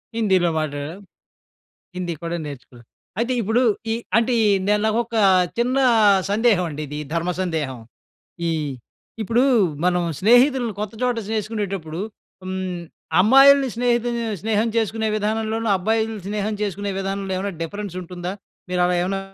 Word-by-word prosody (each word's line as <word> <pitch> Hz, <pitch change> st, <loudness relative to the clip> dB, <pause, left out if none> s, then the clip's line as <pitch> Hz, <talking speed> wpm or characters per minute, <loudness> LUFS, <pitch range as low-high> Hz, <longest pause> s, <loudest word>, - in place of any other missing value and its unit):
హిందీలో 190 Hz, -6 st, +2 dB
మాట్లాడం. 150 Hz, +2 st, -4 dB, 1.0 s
హిందీ 180 Hz, -2 st, -3 dB
కూడా 170 Hz, +1 st, -2 dB
నేర్చుకున్నారు. 125 Hz, -4 st, -11 dB, 0.3 s
అయితే 240 Hz, +2 st, 0 dB
ఇప్పుడు, 225 Hz, +4 st, +1 dB, 0.3 s
ఈ -, -, +1 dB, 0.2 s
అంటే, 235 Hz, +2 st, +2 dB
ఈ -, -, +4 dB, 0.4 s
నాకొక 230 Hz, +1 st, 0 dB, 0.4 s
చిన్న 250 Hz, +3 st, +1 dB, 0.5 s
సందేహం 210 Hz, -3 st, +3 dB
అండి, 150 Hz, 0 st, -5 dB
ఇది 150 Hz, +1 st, -6 dB, 0.2 s
ధర్మ 170 Hz, +2 st, 0 dB
సందేహం. 155 Hz, -8 st, -2 dB, 0.7 s
ఇ -, -, +1 dB, 0.7 s
ఇప్పుడు 230 Hz, +5 st, +2 dB, 0.4 s
మనం, 180 Hz, -1 st, +2 dB, 0.2 s
స్నేహితుల్ని 245 Hz, +2 st, +4 dB
కొత్త 210 Hz, 0 st, -4 dB
చోట 250 Hz, -1 st, +1 dB, 0.2 s
చేసుకునేటప్పుడు, 200 Hz, -6 st, -3 dB, 0.4 s
హ్మ్, 185 Hz, -1 st, -4 dB, 0.4 s
అమ్మాయిల్ని 270 Hz, +5 st, +7 dB
స్నేహితు 240 Hz, 0 st, +1 dB, 0.3 s
స్నేహం 220 Hz, +1 st, +1 dB
చేసుకునే 220 Hz, 0 st, 0 dB
విధానంలోనూ, 220 Hz, +1 st, -1 dB
అబ్బాయిలు 220 Hz, +3 st, 0 dB
స్నేహం 210 Hz, +1 st, -2 dB
చేసుకునే 200 Hz, 0 st, -2 dB
విధానంలో 195 Hz, 0 st, -3 dB
ఏమన్నా 200 Hz, +1 st, -3 dB
డిఫరెన్స్ 200 Hz, +2 st, -5 dB
ఉంటుందా? 180 Hz, +1 st, -6 dB, 0.4 s
మీరు 180 Hz, 0 st, +1 dB
అలా 180 Hz, -, +1 dB
ఏమైనా 195 Hz, +2 st, -1 dB
205 Hz, 125 wpm, -22 LUFS, 180-225 Hz, 1.0 s, అమ్మాయిల్ని